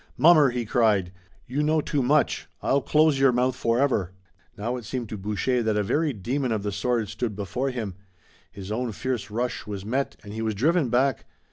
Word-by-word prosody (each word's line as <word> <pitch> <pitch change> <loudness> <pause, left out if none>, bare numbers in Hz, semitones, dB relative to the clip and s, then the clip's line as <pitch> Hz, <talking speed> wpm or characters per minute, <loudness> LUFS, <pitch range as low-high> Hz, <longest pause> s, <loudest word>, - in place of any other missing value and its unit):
"Mummer!" 155 -4 +6
he 120 -1 -3
cried. 105 -6 +2 0.3
"You 135 +4 -2
know 155 +1 +2
too 145 -1 -1
much. 140 +4 +1 0.2
I'll 140 +1 +2
close 155 -1 +3
your 135 -1 +5
mouth 125 +1 +1
forever!" 115 -7 +1 0.4
Now 115 +4 -2
it 120 - -8
seemed 120 0 -4
to 110 - -5
Boucher 105 +5 0
that 110 -2 0
a 105 - +2
very 150 +9 +1
demon 125 +4 -2
of 110 -3 -1
the 105 - -2
sword 115 +2 0
stood 110 0 -3
before 105 +7 -2
him. 115 -7 -4 0.6
His 100 +1 -8
own 120 +1 -2
fierce 125 -1 -3
rush 120 +2 -3
was 100 -2 -5
met 130 +5 -1
and 100 - -9
he 110 - -4
was 110 -1 -1
driven 150 - +2
back. 130 +1 +1
120 Hz, 200 wpm, -25 LUFS, 105-135 Hz, 0.6 s, Mummer